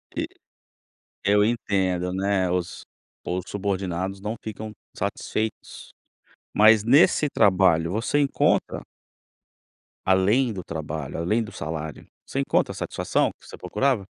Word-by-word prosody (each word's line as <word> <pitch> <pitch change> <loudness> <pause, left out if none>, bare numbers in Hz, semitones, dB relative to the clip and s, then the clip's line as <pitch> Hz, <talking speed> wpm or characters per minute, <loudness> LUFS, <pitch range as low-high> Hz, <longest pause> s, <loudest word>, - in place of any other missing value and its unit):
E - - -1 1.0
eu 105 +1 +4
entendo, 95 -5 0
né, 95 -1 +1
os 90 0 -2 0.4
os 90 +1 -2
subordinados 95 -1 -2
não 105 +3 -4
ficam 110 0 -6 0.3
satisfeitos, 110 0 -4 0.6
mas 110 0 +7
nesse 150 +4 +5
trabalho 90 -7 +3
você 115 +8 0
encontra 140 -2 +1 1.2
além 100 +7 +3
do 95 -4 -6
trabalho, 80 -3 -5
além 105 +8 +1
do 105 - -9
salário, 80 0 -6 0.2
você - - -3
encontra - - +1
a - - -8
satisfação - - 0
que - - -20
você - - -9
procurava? 130 -8 0
95 Hz, 120 wpm, -24 LUFS, 90-110 Hz, 1.2 s, mas